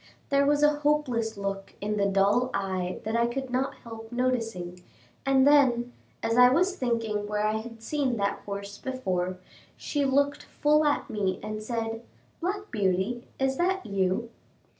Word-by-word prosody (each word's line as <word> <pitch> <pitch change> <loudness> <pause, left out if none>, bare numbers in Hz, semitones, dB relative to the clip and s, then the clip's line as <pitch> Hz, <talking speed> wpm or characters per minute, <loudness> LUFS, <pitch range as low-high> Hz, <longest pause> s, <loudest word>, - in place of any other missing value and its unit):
There 280 0 +3
was 290 0 +3
a 295 0 +4
hopeless 255 -7 0
look 195 -1 -4
in 210 +1 -2
the 200 -1 +2
dull 200 +6 +3
eye 185 -2 -2
that 220 +2 -2
I 235 0 +3
could 260 +1 -4
not 260 +2 0
help 225 -1 -9
noticing, 225 -8 -2 0.5
and 270 -1 +5
then, 250 -4 +4 0.3
as 230 +2 +2
I 250 0 +9
was 365 +8 +2
thinking 225 - -1
where 210 0 0
I 215 +1 +1
had 225 0 -8
seen 270 -2 0
that 200 -1 0
horse 200 0 -6
before, 185 -9 -2 0.4
she 290 -1 -1
looked 280 +1 +2
full 300 +1 +2
at 290 - +1
me 195 -3 -1
and 215 0 -4
said, 225 0 -3 0.4
"Black 400 +4 -3
Beauty, 205 +3 0
is 265 0 0
that 375 +2 0
you?" 200 +4 0
230 Hz, 160 wpm, -27 LUFS, 205-270 Hz, 0.5 s, I